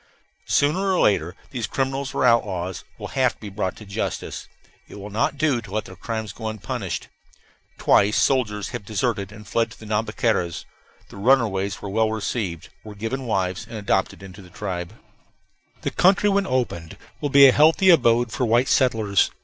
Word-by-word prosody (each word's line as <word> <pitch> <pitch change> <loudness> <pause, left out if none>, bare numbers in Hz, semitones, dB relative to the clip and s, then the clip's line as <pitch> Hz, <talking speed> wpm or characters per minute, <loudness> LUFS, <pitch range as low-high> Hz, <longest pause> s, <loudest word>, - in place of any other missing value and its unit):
Sooner 145 +5 +2
or 180 - +1
later 90 -4 +2 0.2
these 120 -5 -3
criminals 135 0 -2
or - - +2
outlaws 95 -6 +1
will - - -7
have 130 -2 +1
to - - -34
be 105 - -8
brought 95 -2 -3
to 105 - -12
justice; 100 - -4 0.4
it - - -12
will 105 +1 -8
not 115 +7 0
do 145 -5 +1
to 115 - -12
let 110 -1 -2
their 95 - -11
crimes 110 -2 -5
go 110 +1 -6
unpunished. 110 -2 -4 0.7
Twice 105 +2 +3
soldiers 105 -7 +1
have 120 -4 -6
deserted 105 -1 -2
and 105 -1 -12
fled 115 +4 0
to - - -15
the 110 - -11
Nhambiquaras. 105 -5 -1 0.4
The - - -12
runaways 100 -4 +1
were 100 - -4
well 110 +1 +2
received, 105 -6 -3
were 105 -1 -10
given 115 +5 -4
wives, 95 -4 -1
and 115 - -7
adopted 100 -2 -1
into 95 +1 -11
the 90 - -15
tribe. 90 0 -5 0.9
The - - -2
country 195 +3 +4
when 200 0 +1
opened 120 -11 -2 0.2
will 145 - -2
be 140 0 +8
a 135 - +8
healthy 160 +7 +5
abode 120 -6 +4
for 125 - -2
white 120 +2 +2
settlers. 110 -7 +2
110 Hz, 180 wpm, -23 LUFS, 100-130 Hz, 0.9 s, be